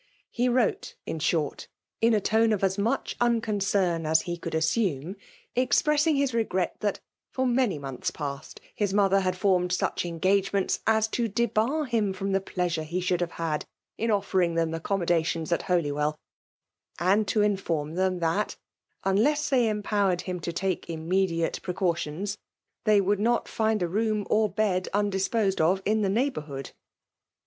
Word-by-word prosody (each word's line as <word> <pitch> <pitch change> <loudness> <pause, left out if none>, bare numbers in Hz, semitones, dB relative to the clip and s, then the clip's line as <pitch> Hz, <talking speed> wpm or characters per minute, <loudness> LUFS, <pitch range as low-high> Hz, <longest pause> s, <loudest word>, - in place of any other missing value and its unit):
He 245 +1 +1
wrote^ 240 -3 0
inahorti 155 -1 -1 0.4
ina 225 -2 +5
iobe^ctf 220 +1 +3
afl 190 +1 0
mueh 230 - -1
Unconcern 200 -8 +1
ad 160 +1 +4
he 175 -1 -3
couId^aaavDie^'enqpfeM 165 - -1
ing - - -20
' - - -27
hi6 280 +2 +2
regret 190 -6 -1
ihat, 205 -2 0 0.3
for 260 - -1
many 245 - +2
tmonths 135 -2 -4
paat^ 140 -2 -6 0.2
fanr 205 -2 +1
mother 195 -1 +4
'had 185 -1 -1
formed 180 -2 +2
such 180 - 0
engageDftenta 190 +3 +1
as 220 0 +3
b» 230 +1 -1
debar, 235 +7 0
him 220 -6 0
from 195 +1 -3
the 195 0 +2
pleasure 180 -3 -2
he 165 +4 -3
shodld 180 -1 0
him 175 - 0
had 165 -3 -3 0.3
in 230 - -2
olfeiing 190 -5 +1
them 165 -1 +1
aiccommodii^ttons 165 -1 -1
at 170 - +2
Holy* 170 -5 +2
well 150 +1 -1 0.4
;< - - -63
and 195 +5 +2
to 215 - +2
iitfoVin 170 -7 -1
them 185 0 +1
that, 165 +6 0 0.5
unless 285 +11 +2
'titeyt 245 -4 +3
empowered 205 -3 0
him 180 -1 -4
to 170 - -4
take 185 +1 -2
immediate 165 +1 0
preeaw^ 180 -1 0
tions, 185 +6 -4 0.5
they 215 -2 +5
would 200 +1 +1
not 235 +2 +1
find 220 -3 0
a - - +1
room 210 +2 0
or.bedun*^ 205 -2 +1
disposed 195 0 0
of 180 +4 +3
in 215 +1 +2
the 200 - +1
neighbourhood. 190 - -2
195 Hz, 155 wpm, -27 LUFS, 170-215 Hz, 0.5 s, ina